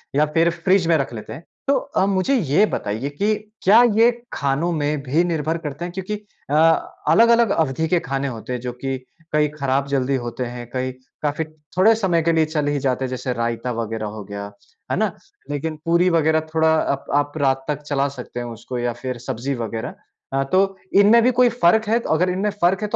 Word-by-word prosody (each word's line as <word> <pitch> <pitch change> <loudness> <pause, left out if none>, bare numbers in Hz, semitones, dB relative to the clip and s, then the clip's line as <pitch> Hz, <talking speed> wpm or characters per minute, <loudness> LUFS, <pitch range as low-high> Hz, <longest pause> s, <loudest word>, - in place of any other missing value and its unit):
या 150 - +4
फिर 165 +1 +4
फ़्रिज 175 +1 +2
में 165 - +4
रख 135 -4 -3
लेते 110 - -7
हैं। 155 - -10 0.2
तो 280 - +4
अ, 190 - 0
मुझे 195 +7 +1
ये 190 - +3
बताइए 110 - -3
कि 205 +9 0 0.3
क्या 215 +5 +7 0.2
ये 230 +2 +7 0.2
खानों 140 +5 0
में 150 -2 -1
भी 145 +6 +2
निर्भर 165 -2 -1
करते 150 +4 -4
हैं 175 - -6
क्योंकि 190 +3 -4 0.3
अ, 145 - +1 0.6
अलग-अलग 235 0 +5
अवधि 160 -1 0
के 175 +1 +2
खाने 135 0 -1
होते 125 0 -5
हैं 125 - -2
जो 125 -1 -4
कि 135 +2 -3 0.4
कई 150 0 +3
खराब 140 -1 0
जल्दी 135 -1 0
होते 120 0 -3
हैं, 120 0 -7
कई 130 0 -1 0.3
काफ़ी 150 +2 -1 0.3
थोड़े 220 +5 +6
समय 185 -6 +1
के 165 - +3
लिए 160 -1 +3
चल 155 -2 -2
ही 145 0 0
जाते 130 -1 0
हैं, - - -4
जैसे 130 0 -3
रायता 115 +1 -2
वग़ैरह 115 -1 -3
हो 105 - -6
गया। 100 0 -7 0.4
है - - +1
ना? - - +1 0.4
लेकिन 150 +2 -3
पूरी 170 +2 +3
वग़ैरह 160 -1 +3
थोड़ा 160 0 +3 0.2
अप 140 - -6
आप 145 +1 0
रात 135 -2 +1
तक 150 -1 -2
चला 140 -1 0
सकते 125 0 -7
हैं 120 - -4
उसको 120 +2 -6
या 120 0 -1
फिर 130 -2 -3
सब्ज़ी 130 +5 -2
वग़ैरह। 115 -1 -4 0.4
अ, 135 0 +2
तो 190 +6 +1 0.2
इनमें 225 +3 +6
भी 255 - +4
कोई 245 - +6
फ़र्क 220 -1 +3
है? 230 +1 +3
अगर 175 +3 +2
इनमें 190 +3 0
फ़र्क 185 +4 +3
है 210 - -1
150 Hz, 210 wpm, -21 LUFS, 130-180 Hz, 0.6 s, क्या